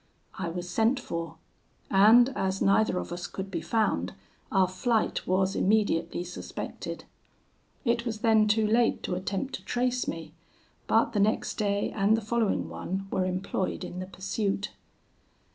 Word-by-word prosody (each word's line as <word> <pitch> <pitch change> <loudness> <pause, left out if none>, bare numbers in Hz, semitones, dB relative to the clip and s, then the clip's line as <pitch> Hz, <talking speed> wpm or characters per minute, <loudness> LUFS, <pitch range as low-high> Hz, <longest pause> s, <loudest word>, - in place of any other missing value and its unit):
I 180 -3 -2
was 175 +1 -5
sent 225 +8 +2
for; 165 -1 -5 0.6
and 220 +6 +7
as 190 -8 -1
neither 195 -1 +3
of - - -4
us 175 +1 -4
could 195 0 -6
be 170 -3 -2
found, 215 +6 0 0.4
our 190 -2 +4
flight 215 +5 0
was 190 +1 +2
immediately 185 -5 +1
suspected. 180 0 -6 0.8
It 235 0 +2
was 225 -3 -4
then 220 -2 +4
too 215 +1 +3
late 230 +2 +2
to - - -2
attempt 195 +8 -3
to - - -18
trace 250 0 0
me, 165 -1 -5 0.5
but - - +3
the 210 - +1
next 210 +2 +1
day 200 -1 0
and 210 +1 +3
the - - -3
following 225 0 0
one 195 +1 -5
were 185 - +1
employed 185 0 -2
in 180 - -6
the 185 - -5
pursuit. 195 +2 -2
200 Hz, 155 wpm, -28 LUFS, 185-220 Hz, 0.8 s, and